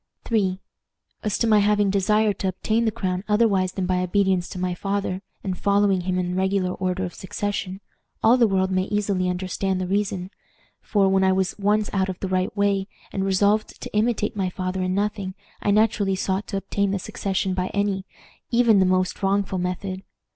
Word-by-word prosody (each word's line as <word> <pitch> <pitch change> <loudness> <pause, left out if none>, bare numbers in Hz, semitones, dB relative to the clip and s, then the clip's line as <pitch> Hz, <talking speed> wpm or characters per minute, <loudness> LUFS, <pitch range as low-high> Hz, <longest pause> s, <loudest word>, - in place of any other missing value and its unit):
"III. 190 -4 +1 0.6
As 210 -2 -1
to - - +1
my 215 -2 +5
having 205 -1 +3
desired 210 +2 +2
to 190 - -1
obtain 220 +5 0
the 220 - +2
crown 185 -2 -2
otherwise 210 -4 +2
than 190 - -2
by 180 0 +1
obedience 190 -1 +1
to - - -7
my 180 0 -1
father, 195 0 -2 0.2
and 190 -2 -2
following 200 -2 +3
him 180 +1 -1
in 180 -1 -1
regular 190 0 +1
order 185 0 -2
of 175 - -6
succession, 190 0 -4 0.4
all 225 +3 +6
the 240 -3 +4
world 190 -1 +1
may 185 0 +1
easily 200 -3 0
understand 185 +1 -1
the 185 - -1
reason; 195 -1 -1 0.5
for, 200 -3 +2
when 190 0 +3
I 190 - +4
was 190 0 0
once 210 +1 +2
out 190 -1 +1
of 185 - -5
the 195 - -3
right 185 +2 -1
way, 200 -1 +1 0.3
and 195 - -1
resolved 200 +3 +1
to - - -8
imitate 215 -1 +1
my 190 -2 0
father 185 +1 -3
in 185 0 0
nothing, 200 -2 -2 0.3
I - - 0
naturally 205 -2 +3
sought 190 +1 -2
to 195 - -2
obtain 200 +1 -1
the 200 - 0
succession 190 0 -2
by 185 0 -1
any, 200 -1 -1 0.5
even 235 -3 +4
the 190 - +4
most 185 0 +1
wrongful 195 -1 +1
method. 185 +1 -3
195 Hz, 190 wpm, -24 LUFS, 185-205 Hz, 0.6 s, all